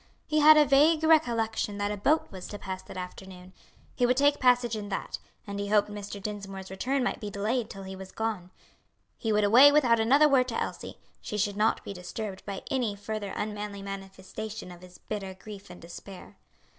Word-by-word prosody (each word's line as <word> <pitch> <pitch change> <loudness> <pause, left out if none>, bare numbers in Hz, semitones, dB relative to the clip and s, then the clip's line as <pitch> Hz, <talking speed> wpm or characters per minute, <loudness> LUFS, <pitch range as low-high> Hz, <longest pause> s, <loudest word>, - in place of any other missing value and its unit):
He 305 - +1
had 305 +1 +8
a 300 - +6
vague 305 +3 +4
recollection 230 -10 +2
that 205 0 -1
a - - -2
boat 290 +11 +1
was 185 -2 -8
to 205 - -7
pass 190 -2 -6
that - - -11
afternoon. 185 0 -9 0.4
He 245 - +2
would 250 +1 +2
take 285 +1 +3
passage 245 -2 +3
in 205 -1 -5
that, 195 - -4 0.3
and 200 0 -5
he 200 - -2
hoped 210 0 +2
Mr. 205 0 -7
Dinsmore's 195 -2 -6
return 255 +8 -1
might - - -1
be 210 - -4
delayed 215 +4 -1
till 195 -1 -8
he 190 0 -7
was 190 0 -10
gone. 215 -5 -3 0.7
He 225 - -1
would 210 0 +3
away 245 +8 +8
without 250 -6 +4
another 275 +7 +5
word 265 -3 +3
to 230 - -2
Elsie; - - -5 0.2
she 210 - -5
should 205 -1 0
not 215 +2 +1
be - - -6
disturbed 190 +2 -6
by 195 -1 -5
any 245 -6 0
further 205 0 -5
unmanly 210 -1 -4
manifestation 195 +1 -7
of 175 0 -12
his 180 -1 -14
bitter 195 -3 -6
grief 200 0 -11
and 180 - -11
despair. 180 +3 -11
210 Hz, 200 wpm, -28 LUFS, 195-245 Hz, 0.7 s, had